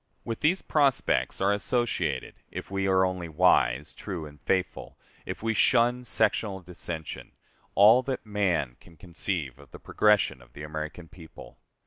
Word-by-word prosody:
With 115 -1 -4
these 175 +5 +2
prospects 140 -4 +1
are 100 +1 +3
associated 120 +3 -1 0.2
if - - -8
we 95 0 -1
are 95 -1 +4
only 90 -2 -3
wise, 75 -5 +2
true, 90 -5 -6
and 75 -1 -13
faithful, 95 -1 -2 0.3
if - - -6
we 115 0 +1
shun 120 +2 +3
sectional 105 -3 +1
dissension 85 -2 -7 0.4
all 110 +5 +7
that 130 -2 -4
man 90 - -1
can 85 - -19
conceive 85 -7 -4
of 70 -2 -16
the - - -11
progression 105 -10 +2
of - - -20
the 75 - -9
American 75 +2 -6
people. 80 -8 -14
95 Hz, 150 wpm, -27 LUFS, 80-110 Hz, 0.4 s, all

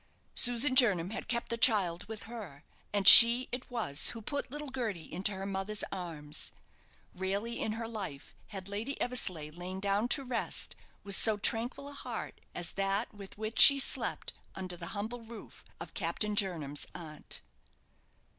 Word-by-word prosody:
Susan 245 +2 +4
Jernam 200 -9 +4
had - - -6
kept 235 0 -2
the 235 - -4
child 190 -8 +2
with 220 0 -8
her, 205 -12 -11 0.3
and 200 -2 -1
she 235 +2 +11
it 250 +1 -7
was 220 - 0
who - - -9
put 285 +4 -5
little 295 +1 -8
Gerty 225 -10 -5
into 190 +5 -1
her 190 0 -7
mother's 195 +2 -4
arms. 155 -5 -5 0.6
Rarely 200 +5 -4
in 215 - -3
her 225 +1 -6
life 195 -11 -8
had 195 -3 -8
Lady 215 +8 -6
Eversleigh 185 -11 -1
lain 180 +3 -8
down 200 +3 -1
to 275 +3 -1
rest 250 -2 -2 0.3
with 200 -1 +2
do 220 -2 +3
tranquil 230 +6 -2
a - - -10
heart 280 - -8
as 175 -2 -3
that 195 +3 -3
with 200 -1 -13
which 215 +1 -5
she 280 - +10
slept 270 - -2 0.2
under 185 -2 -6
the 170 -1 -9
humble 225 +4 -6
roof 225 -1 -13 0.2
of - - -10
Captain 210 -1 -3
Jernam's 160 -8 -1
aunt. 155 -3 -8
205 Hz, 165 wpm, -30 LUFS, 185-235 Hz, 0.6 s, she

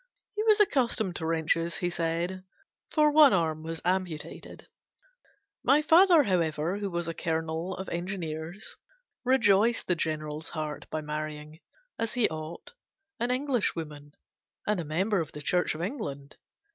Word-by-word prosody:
He 420 - -2
was 430 -1 +4
accustomed 235 - +2
to 160 - -3
wrenches, 165 +1 0
he 175 -1 -1
said, 170 +2 -2 0.5
for 300 -1 +4
one 295 -2 +7
arm 160 -3 +1
was 165 0 -6
amputated. 180 -4 -3 1.0
My 295 +2 +4
father, 335 0 +7
however, 170 - 0
who 200 -1 -2
was 170 -2 -3
a 165 - -2
Colonel 160 +2 -2
of 190 - -6
Engineers, 170 +1 -5 0.5
rejoiced 230 -3 +3
the 180 - +2
General's 155 -1 -3
heart 155 -2 -5
by 155 - -3
marrying, 150 +1 -5 0.4
as 230 0 -1
he 245 -3 +3
ought, 160 - -7 0.5
an 240 +1 0
Englishwoman, 170 - -2 0.5
and 210 -2 +1
a - - -2
member 185 +7 0
of 155 - -6
the 150 - -6
Church 180 +1 +1
of 165 - -4
England. 145 - -5
175 Hz, 145 wpm, -28 LUFS, 155-220 Hz, 1.0 s, one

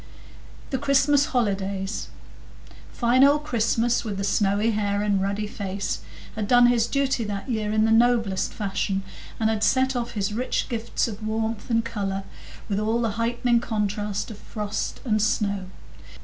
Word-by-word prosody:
The 265 - 0
Christmas 280 +1 +3
Holidays 200 -4 -1 0.8
Fine 245 +2 +3
old 290 +2 +5
Christmas, 235 -3 +1
with 210 -4 -4
the 195 - -2
snowy 205 +2 +2
hair 205 -1 0
and 200 -2 +1
ruddy 200 +2 -1
face, 200 -1 -3 0.4
had 215 -2 -2
done 245 +1 +6
his 240 -2 +3
duty 270 -2 0
that 200 +1 -4
year 215 -4 -1
in 215 0 +3
the 220 - +2
noblest 225 -4 +3
fashion, 195 -1 -2 0.4
and 220 - +2
had 220 -1 0
set 260 0 +3
off 240 -1 -2
his 205 -1 -1
rich 245 +4 -1
gifts 230 0 -1
of 215 -1 -7
warmth 220 +1 -2
and 230 -1 +2
colour 195 -4 -3 0.4
with 200 -2 -1
all 220 +2 +1
the 230 -2 0
heightening 240 +1 +2
contrast 210 -2 -2
of 210 - -10
frost 210 -2 -4
and 215 -3 +2
snow. 200 -2 0
220 Hz, 160 wpm, -25 LUFS, 205-240 Hz, 0.8 s, done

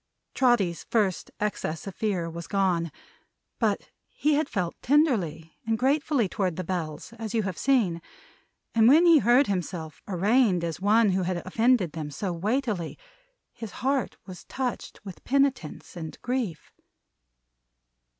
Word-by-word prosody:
Trotty's 220 -10 +2
first 205 -6 0
excess 200 -6 -3
of 195 - -6
fear 195 -6 -1
was 170 0 -7
gone. 180 -5 +1 0.7
But - - 0 0.2
he 300 +1 +1
had 295 0 +1
felt 180 -4 -2
tenderly 200 - +1
and 225 0 0
gratefully 275 -2 +2
toward 185 -3 -1
the 185 - -3
Bells, 165 +1 -4
as 225 -1 -4
you 220 - +2
have 190 -2 -3
seen; 210 -11 +1 0.7
and 225 -1 +5
when 310 +7 +7
he 335 -3 +7
heard 245 +4 +5
himself 175 - -4
arraigned 200 0 +2
as 170 +1 -4
one 210 +1 +4
who 185 +1 +1
had 180 0 -1
offended 220 -2 +2
them 155 -2 -5
so 175 +6 -3
weightily, 210 -1 -2 0.6
his 225 -5 -8
heart 270 -2 0
was 185 -3 -10
touched 255 -2 -4
with 190 -3 -9
penitence 270 - 0
and 160 -2 -7
grief. 245 - -3
200 Hz, 140 wpm, -27 LUFS, 175-245 Hz, 0.7 s, when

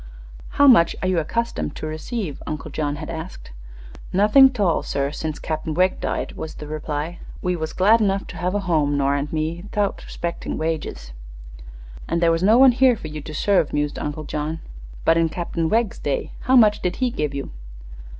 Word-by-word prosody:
"How 285 - +6
much 230 -11 +6
are - - +1
you 185 -2 +2
accustomed 230 -1 -2
to - - -6
receive?" 155 - -4
Uncle 155 0 -5
John 145 -1 -2
had 155 +2 -6
asked. 165 - -8 0.6
"Nothing 210 +8 +6
'tall, 205 -10 +1
sir, 140 0 -2
since 155 0 -4
Cap'n 155 -1 -4
Wegg 185 +1 +2
died," - - -2
was 160 - -7
the 150 - -8
reply. 155 +2 -4 0.2
"We 180 0 0
was 160 -1 -4
glad 215 +5 +4
enough 195 -1 +1
to - - -8
have 180 +3 -1
a 205 - 0
home, 155 -6 +1
Nora 140 0 +1
an' 140 - -3
me, 160 +2 -2
'thout 205 -1 -1
'spectin' 170 0 -4
wages." 155 - -3 1.0
"And 170 - 0
there 170 -1 +4
was 165 0 0
no 215 +5 +5
one 265 0 +8
here 255 0 +4
for 160 -7 -8
you 150 0 -6
to 155 +1 -8
serve," 195 -2 +2
mused 145 0 -1
Uncle 150 +1 -4
John. 155 +2 -3 0.5
"But 165 - +4
in 165 -1 +2
Captain 165 0 -2
Wegg's 230 +1 0
day, 140 -2 -2
how 260 - +4
much 215 -4 +5
did 180 0 -1
he 255 -2 0
give 150 -8 -2
you?" 140 - -5
165 Hz, 195 wpm, -22 LUFS, 155-200 Hz, 1.0 s, one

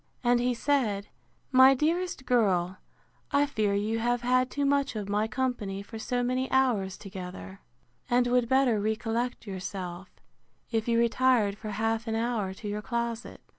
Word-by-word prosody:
—And 240 0 +3
he 245 0 +1
said, 230 -7 0 0.4
My 260 +1 +7
dearest 330 +1 -1
girl, 190 -7 +1 0.5
I 285 0 +3
fear 215 -8 0
you 215 +3 0
have 240 +1 0
had 255 +1 +2
too 285 +1 -1
much 280 -2 +1
of 210 -2 -4
my 210 +2 0
company 220 -5 -2
for 225 +2 -9
so 245 +2 -1
many 255 +1 -1
hours 235 -8 +1
together; 180 - -8 0.5
and 245 0 +3
would 245 -1 +2
better 260 -5 +3
recollect 225 +3 -2
yourself, 185 -2 -6 0.6
if 225 -1 -1
you 230 -1 +2
retired 235 -3 +3
for 215 +1 -7
half 225 +2 -1
an 225 - -1
hour 225 -4 -1
to 200 +3 -8
your 205 +1 -3
closet. 235 0 -4
230 Hz, 160 wpm, -28 LUFS, 205-250 Hz, 0.6 s, My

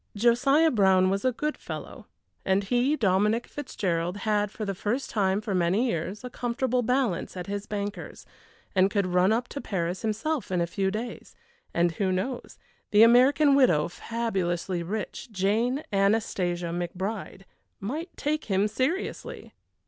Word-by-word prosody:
Josiah 275 +8 +4
Brown 190 -4 +4
was 195 0 -1
a 255 - +3
good 300 +5 -2
fellow, - - -8 0.4
and 190 +1 +2
he, 245 +7 +2
Dominic 210 0 +2
Fitzgerald, 180 -10 -3
had 210 -1 +1
for 215 +1 -6
the 200 - -2
first 215 +8 -2
time 195 -1 +1
for 210 -2 -3
many 185 +6 +2
years 185 +4 -3
a 250 - -5
comfortable 250 +1 -1
balance 245 -8 0
at 180 - -4
his 200 +1 -4
bankers, 205 0 -5 0.5
and 190 0 +4
could 200 -1 0
run 180 +2 +3
up 240 +2 0
to 280 - -5
Paris 180 -2 -2
himself 225 +5 -2
in 180 -1 0
a 170 - +2
few 190 +3 -1
days, 225 +4 -6 0.4
and 170 0 +2
who 190 +3 -1
knows, 235 +8 -3 0.3
the 210 +1 +6
American 270 +5 +6
widow, 245 - +4
fabulously 185 -4 -2
rich 210 +6 -5
Jane 220 +8 0
Anastasia 195 -4 +1
McBride 190 +3 -4 0.4
might 300 - -4
take 305 +1 -1
him 195 0 +2
seriously! 265 - -3
205 Hz, 150 wpm, -27 LUFS, 185-245 Hz, 0.5 s, the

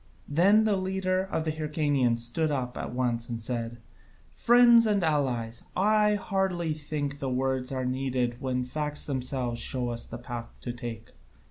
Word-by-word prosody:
Then 195 +9 +4
the 210 -2 +2
leader 185 0 0
of 160 -4 -3
the 155 - 0
Hyrcanians 145 -6 0
stood 155 +7 0
up 130 -4 -2
at - - -5
once 120 -2 -1
and 115 -1 -3
said: 115 0 -3 0.5
"Friends 235 -1 +6
and 205 -3 +2
allies, 125 -7 0
I 210 +2 +3
hardly 190 -5 -1
think 145 -2 -4
that 135 - -2
words 130 0 -1
are 130 -1 -2
needed 125 -1 -1
when 130 -2 -1
facts 150 +3 -2
themselves 125 -3 -2
show 125 -2 -2
us 120 0 -4
the 115 - -7
path 120 -1 -7
to 120 - -4
take. 115 -2 -7
135 Hz, 160 wpm, -28 LUFS, 125-170 Hz, 0.5 s, Friends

